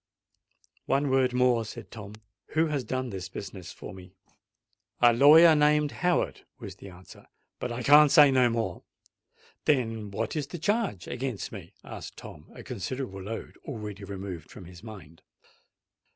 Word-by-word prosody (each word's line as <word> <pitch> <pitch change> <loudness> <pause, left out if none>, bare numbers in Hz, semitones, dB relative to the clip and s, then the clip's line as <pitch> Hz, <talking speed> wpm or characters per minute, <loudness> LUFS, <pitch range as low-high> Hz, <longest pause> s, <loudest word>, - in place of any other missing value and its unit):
"One 140 0 +1
word 130 -1 +3
more," 125 -2 +2
said 110 - -10
Tom. 105 -2 -9 0.4
"Who 160 +1 +4
has 150 -4 -2
done 130 +1 -3
this 95 -1 -6
business 95 -2 -8
for - - -10
me?" 95 0 -13 0.8
"A 120 -1 +6
lawyer 155 +6 +8
named 150 0 +3
Howard," 180 0 -1
was 100 -5 -9
the 100 - -11
answer. 90 0 -15 0.3
"But 125 - -4
I 120 +1 -4
can't 150 +3 +7
say 145 -2 +7
no 130 -2 +4
more——" 115 -6 -2 0.8
"Then 115 -7 0
what 110 +6 -3
is 150 -3 -2
the 175 - -7
charge 200 - -1
against 125 -4 -4
me?" - - -10
asked - - -9
Tom, - - -11
a - - -10
considerable 100 +1 -5
load 110 +4 -7
already 105 -6 -7
removed 95 -5 -7
from 95 - -11
his 90 0 -13
mind. 95 -8 -12
120 Hz, 155 wpm, -28 LUFS, 100-140 Hz, 0.8 s, lawyer